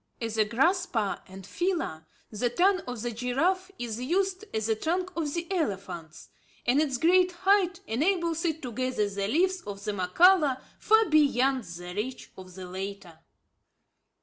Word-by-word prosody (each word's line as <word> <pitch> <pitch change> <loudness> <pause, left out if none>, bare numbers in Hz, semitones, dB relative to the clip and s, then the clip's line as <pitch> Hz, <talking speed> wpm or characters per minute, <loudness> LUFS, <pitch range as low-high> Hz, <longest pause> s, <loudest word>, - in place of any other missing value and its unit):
As 225 -2 -3
a 215 - +5
grasper 255 - +1
and 190 0 -11
feeler, 325 - -2 0.2
the 235 +3 0
tongue 370 +9 +3
of 245 -3 -5
the 240 - -2
giraffe 295 - 0
is 235 -1 -4
used, 375 +8 0
as 220 -1 -2
the 220 0 +1
trunk 360 +9 -2
of 315 -3 -2
the 340 0 -2
elephants; 190 - -4 0.4
and 265 +5 +3
its 275 -5 0
great 360 +5 +4
height 380 -2 +3
enables 330 - 0
it 320 -3 -1
to 250 - -4
gather 255 -3 -1
the 200 0 -3
leaves 365 - +1
of 200 -1 -8
the 210 - -1
mokhala 275 - +4 0.2
far 440 +1 +4
beyond 275 -5 +3
the 175 +1 -8
reach 230 +6 -5
of 185 -1 -12
the 190 -1 -7
latter. 190 -2 -7
255 Hz, 160 wpm, -28 LUFS, -, 0.4 s, a